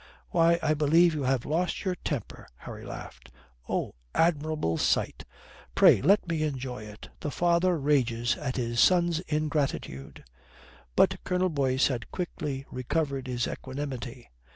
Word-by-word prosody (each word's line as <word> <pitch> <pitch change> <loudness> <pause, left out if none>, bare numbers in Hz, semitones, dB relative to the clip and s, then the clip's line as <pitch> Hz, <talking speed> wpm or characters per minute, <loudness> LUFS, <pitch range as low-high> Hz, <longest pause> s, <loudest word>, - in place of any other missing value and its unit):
"Why, 170 0 +4
I 155 -1 +3
believe 160 +3 +4
you 145 -3 -2
have 130 -1 +1
lost 175 +6 -1
your 185 - +1
temper." 145 - -5
Harry - - -9
laughed. 60 0 -9 0.4
"Oh, - - -1 0.2
admirable 155 - +1
sight! - - 0 0.5
Pray - - +6
let 200 -1 +4
me 165 -2 -1
enjoy 130 -6 -3
it! 105 0 -11
The 150 - -3
father 175 +2 +2
rages 125 -5 +1
at 135 -4 -3
his 120 -1 -1
son's 175 -1 +4
ingratitude!" 150 - -2 0.7
But - - +3
Colonel 185 0 +1
Boyce 135 -4 +1
had 120 -4 -4
quickly 145 -6 -4
recovered 140 +1 -2
his 120 -2 -1
equanimity. 130 -3 -6
145 Hz, 135 wpm, -28 LUFS, 125-165 Hz, 0.7 s, Pray